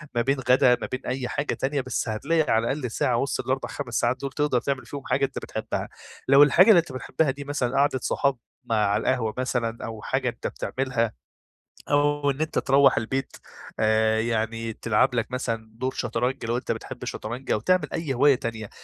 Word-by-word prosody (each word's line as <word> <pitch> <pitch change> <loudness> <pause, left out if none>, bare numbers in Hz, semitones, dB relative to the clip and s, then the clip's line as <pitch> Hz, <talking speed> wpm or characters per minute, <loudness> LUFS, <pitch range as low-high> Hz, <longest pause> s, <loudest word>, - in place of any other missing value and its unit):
ما 120 - +3
بين 135 +3 +1
غدا 125 -1 +4
ما - - -3
بين 130 +1 -4
أي 130 0 -2
حاجة 140 +4 -2
تانية، 140 +1 -1
بس 130 -2 -2
هتلاقي 150 +9 0
على 115 +1 +2
الأقل 135 -4 -3
ساعة 115 - +1
وسط 135 +4 -1
ال4 130 +1 -1
5 125 -5 -6
ساعات 120 +2 +1
دول 140 -1 -3
تقدر 145 -2 +1
تعمل 135 -3 -2
فيهم 140 +3 -7
حاجة 140 - +2
أنت - - -5
بتحبها، - - -4 0.4
لو 140 +2 +8
الحاجة 170 +8 +6
اللي 200 -6 +8
أنت 165 -4 -3
بتحبها 130 +3 0
دي 140 +2 -8
مثلًا 140 -3 -2
قعدة 140 -1 +2
صحاب 140 -2 +1 0.3
م 120 - -2
على 105 -1 +2
القهوة 115 -4 0
مثلًا 120 -2 -1
أو 110 -1 -7
حاجة - - -1
أنت - - -5
بتعملها، 125 -4 -2 0.8
أو 145 0 +2
إن 140 +3 -5
أنت 155 0 0
تروّح 135 0 +4
البيت 130 +4 -2 0.4
آآ، 110 0 +3
يعني 115 0 -2
تلعب 115 +4 +1
لك 115 +1 -1
مثلًا 115 -3 -3
دور 130 +3 -3
شطرنج 125 +1 -2
لو 115 +1 0
أنت 125 - -3
بتحب - - -6
الشطرنج 120 +5 -5
أو - - +2
تعمل 185 - +2
أي 155 -5 -2
هواية 140 +2 +5
تانية، 115 -4 -5
130 Hz, 200 wpm, -25 LUFS, 115-140 Hz, 0.8 s, لو